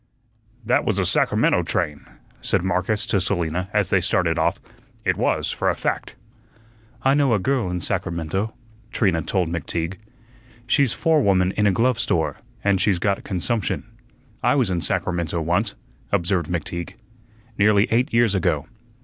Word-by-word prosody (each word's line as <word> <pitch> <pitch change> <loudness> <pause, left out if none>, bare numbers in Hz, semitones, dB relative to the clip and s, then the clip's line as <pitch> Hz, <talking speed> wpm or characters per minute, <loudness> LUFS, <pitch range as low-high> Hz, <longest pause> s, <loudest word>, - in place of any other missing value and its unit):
"That - - +2
was - - 0
a - - +1
Sacramento - - +2
train," 75 -1 -2 0.3
said 95 - +1
Marcus 95 +4 +1
to 100 - +1
Selina 90 -1 -1
as 105 -3 +1
they 95 - +4
started 85 -2 +1
off; 85 +4 +1 0.5
"it 90 -1 +2
was, - - 0
for - - 0
a - - 0
fact." - - -3 0.9
"I 135 - +4
know 140 -5 +3
a - - +3
girl 125 -2 0
in 90 0 -3
Sacramento," 85 +7 -2 0.4
Trina 90 -6 +1
told 90 +1 0
McTeague. 85 +2 -3 0.7
"She's 130 +1 +3
forewoman 100 - +2
in 105 +1 +1
a - - +4
glove 115 +4 +1
store, 80 -9 0 0.3
and 100 -2 +2
she's 100 -4 +2
got 100 +3 -1
consumption." 105 +3 -1 0.6
"I - - +3
was 125 -9 +2
in 85 -2 -1
Sacramento 85 -3 -1
once," 90 +6 0 0.4
observed 85 -2 +1
McTeague, 85 0 -4 0.6
"nearly 105 0 +4
eight 120 +3 +2
years 115 -3 +3
ago." 80 -6 0
95 Hz, 150 wpm, -22 LUFS, 85-105 Hz, 0.9 s, they